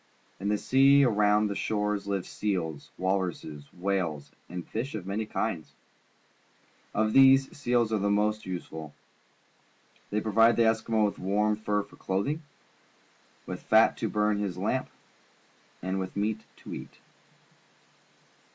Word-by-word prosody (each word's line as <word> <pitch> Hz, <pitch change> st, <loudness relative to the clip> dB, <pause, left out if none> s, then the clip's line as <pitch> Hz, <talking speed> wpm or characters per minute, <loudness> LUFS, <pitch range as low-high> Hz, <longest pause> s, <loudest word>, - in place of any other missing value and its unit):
In 100 Hz, +2 st, -2 dB
the 105 Hz, -, +2 dB
sea 135 Hz, +4 st, +5 dB
around 105 Hz, -2 st, +3 dB
their 100 Hz, -1 st, -2 dB
shores 105 Hz, -1 st, -1 dB
live 100 Hz, -2 st, -1 dB
seals, 85 Hz, -8 st, -3 dB
walruses, 90 Hz, -6 st, -2 dB
whales, 90 Hz, -6 st, -2 dB, 0.2 s
and 90 Hz, 0 st, -6 dB
fish 115 Hz, +3 st, -4 dB
of 100 Hz, -4 st, -5 dB
many 105 Hz, +3 st, -3 dB
kinds. 85 Hz, -8 st, -3 dB, 1.2 s
Of 110 Hz, 0 st, +1 dB
these, 135 Hz, 0 st, +6 dB
seals 120 Hz, -5 st, +1 dB
are 110 Hz, -, +2 dB
the 100 Hz, +1 st, +1 dB
most 105 Hz, +1 st, +1 dB
useful. 80 Hz, -4 st, -7 dB, 1.2 s
Thej' 105 Hz, +1 st, 0 dB
provide 115 Hz, +2 st, +4 dB
the 115 Hz, -1 st, +4 dB
An 110 Hz, -, +5 dB
Eskimo 110 Hz, -, -10 dB
Family 110 Hz, -1 st, 0 dB
Eskimo -, -, +5 dB
with 100 Hz, -, -2 dB
warm 105 Hz, +3 st, +1 dB
fur 105 Hz, -1 st, -1 dB
for -, -, -18 dB
clothing, 100 Hz, +12 st, -1 dB, 1.0 s
with -, -, -6 dB
fat 110 Hz, +1 st, +4 dB
to 110 Hz, -, -2 dB
burn 105 Hz, 0 st, +1 dB
in 105 Hz, -, -1 dB
his 95 Hz, -, -4 dB
lamp, -, -, -1 dB, 0.9 s
and 95 Hz, +1 st, -1 dB
with 95 Hz, +1 st, -5 dB
meat 110 Hz, +2 st, -1 dB, 0.2 s
to -, -, -7 dB
eat. -, -, -9 dB
105 Hz, 150 wpm, -28 LUFS, 95-110 Hz, 1.2 s, these